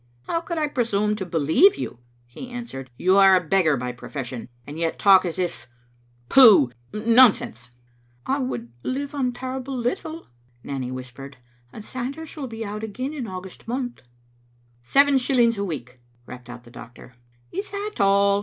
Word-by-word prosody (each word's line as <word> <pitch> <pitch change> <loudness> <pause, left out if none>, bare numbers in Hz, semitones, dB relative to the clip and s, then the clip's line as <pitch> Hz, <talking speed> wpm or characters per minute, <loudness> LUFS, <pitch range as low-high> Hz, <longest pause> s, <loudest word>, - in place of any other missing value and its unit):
" 120 - -36
How 335 - -1
could 340 0 -5
I 305 -1 +1
presume 210 -6 0
to 190 -3 -5
believe 165 - +4
you?" - - -6 0.3
he 125 - -10
answered. 235 - -7
" - - -34
You 185 +2 +3
are 195 -1 +7
a - - +5
beggar 160 -5 +3
by 125 0 -3
profession, 125 -1 -7 0.2
and 150 +3 -8
yet 165 -1 -1
talk 195 -2 +6
as 170 -1 -3
if 180 -2 -3 0.3
— 120 0 -36
pooh, 210 - +7 0.2
nonsense." 215 - +3 0.6
"I 275 +2 0
would 120 - -4
live 275 - -3
on 265 -3 0
terrible 260 +1 -5
little," 310 +7 -3 0.4
Nanny 130 -3 -4
whispered, 130 +2 -9 0.3
"and 215 - -10
Sanders 275 +5 -6
will 285 -4 -5
be 225 -1 -6
out 210 +1 -6
again 255 +7 -4
in 265 -6 -5
August 185 +1 -9
month." 245 - -4 0.5
" 120 0 -36
Seven 280 0 +5
shillings 240 -4 +2
a - - 0
week," 130 -9 -6 0.3
rapped 125 0 -11
out 120 0 -9
the 120 - -16
doctor. 120 +1 -13 0.2
" 120 0 -36
Is 395 +3 -4
that 410 +1 -4
all?" 200 0 +4
200 Hz, 180 wpm, -23 LUFS, -, 0.6 s, are